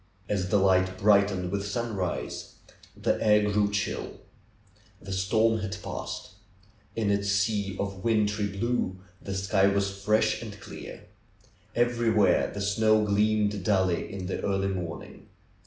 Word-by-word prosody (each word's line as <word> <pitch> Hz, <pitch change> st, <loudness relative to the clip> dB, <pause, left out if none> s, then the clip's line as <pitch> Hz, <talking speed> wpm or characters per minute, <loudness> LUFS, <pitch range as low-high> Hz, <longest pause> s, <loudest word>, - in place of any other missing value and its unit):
As 95 Hz, -3 st, -1 dB
the 105 Hz, -, +3 dB
light 95 Hz, -1 st, +3 dB
brightened 100 Hz, -3 st, +3 dB
with 100 Hz, 0 st, -1 dB
sunrise, 105 Hz, -5 st, -3 dB, 0.4 s
the -, -, 0 dB
air 105 Hz, -1 st, +4 dB
grew 105 Hz, 0 st, +2 dB
chill. 105 Hz, 0 st, -3 dB, 0.8 s
The 95 Hz, 0 st, -7 dB
storm 110 Hz, +4 st, +2 dB
had 100 Hz, -2 st, -4 dB
passed. -, -, -6 dB, 0.6 s
In 110 Hz, -3 st, +1 dB
its 100 Hz, 0 st, +1 dB
sea 100 Hz, -1 st, 0 dB
of 100 Hz, -1 st, -4 dB
wintry 105 Hz, -2 st, +1 dB
blue 100 Hz, -1 st, -1 dB, 0.2 s
the 100 Hz, -, -5 dB
sky 95 Hz, 0 st, +2 dB
was 100 Hz, 0 st, +1 dB
fresh 105 Hz, +2 st, +1 dB
and -, -, -8 dB
clear. -, -, -9 dB, 0.7 s
Everywhere 120 Hz, -2 st, +3 dB
the 100 Hz, -, -5 dB
snow 110 Hz, +1 st, +3 dB
gleamed 105 Hz, -1 st, +1 dB
dully 95 Hz, -3 st, +1 dB
in 95 Hz, -1 st, -5 dB
the 95 Hz, -, -3 dB
early 95 Hz, -1 st, 0 dB
morning. 90 Hz, -4 st, -6 dB
100 Hz, 135 wpm, -27 LUFS, 95-105 Hz, 0.8 s, air